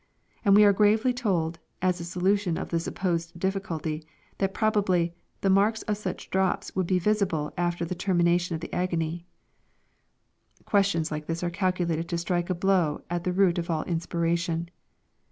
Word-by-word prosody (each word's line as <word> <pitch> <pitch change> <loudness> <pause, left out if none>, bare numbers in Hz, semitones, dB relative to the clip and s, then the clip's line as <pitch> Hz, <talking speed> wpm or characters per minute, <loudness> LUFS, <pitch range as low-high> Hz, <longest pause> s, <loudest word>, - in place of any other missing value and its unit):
And 200 -3 +5
we 210 - +8
are 205 -1 +6
gravely 215 +5 +3
told, 175 -9 -1 0.2
as 180 -1 +1
a - - -5
solution 180 +1 0
of - - -4
the 165 - 0
supposed 170 -1 -2
difficulty, 165 -5 -2 0.4
that 195 -1 +1
probably 195 -6 +1
" - - -43
the 195 - +2
marks 210 +3 +3
of 210 - -1
such 195 -3 -6
drops 190 -1 0
would 185 -2 0
be 185 - +2
visible 180 -6 0
after 175 -1 -1
the 170 - -3
termination 175 -1 +1
of 160 - -6
the - - -7
agony 170 -1 -2 1.3
I" - - -27
Questions 195 -6 +1
like 150 0 -4
this 165 +1 -3
are 175 - -1
calculated 170 -3 -1
to 170 - -1
strike 175 0 -1
a 185 - +1
blow 180 -4 +1
at 175 -1 -2
the 180 - +1
root 185 -2 +3
of 170 - -4
all 160 -2 0
inspiration. 170 0 -1
175 Hz, 175 wpm, -27 LUFS, 170-195 Hz, 1.3 s, we